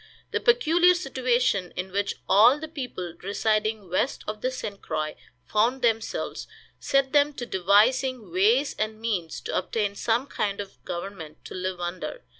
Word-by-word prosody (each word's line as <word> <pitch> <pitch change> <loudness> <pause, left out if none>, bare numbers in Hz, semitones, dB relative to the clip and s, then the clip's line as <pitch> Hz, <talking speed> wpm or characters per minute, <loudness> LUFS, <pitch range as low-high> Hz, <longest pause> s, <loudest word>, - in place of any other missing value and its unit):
The - - 0
peculiar 360 -7 +4
situation 250 - 0
in 185 +1 -4
which 200 +1 -1
all 230 +8 +6
the 315 +1 -6
people 250 - -6
residing 215 +1 0
west 185 +9 -1
of 215 0 -5
the 255 - +1
St. 210 -6 -6
Croix 155 -1 -3 0.3
found 235 +5 +1
themselves 225 -2 -1 0.3
set 275 -1 +1
them 295 0 +4
to 245 - -5
devising 220 +3 +2
ways 225 - +3
and 215 0 -2
means 200 -8 -2
to - - -4
obtain 210 -3 -1
some 230 +5 0
kind 200 -7 -2
of 200 -1 -8
government 170 -3 -7
to - - -8
live 185 0 -3
under. 175 - -5
215 Hz, 155 wpm, -26 LUFS, 190-260 Hz, 0.3 s, all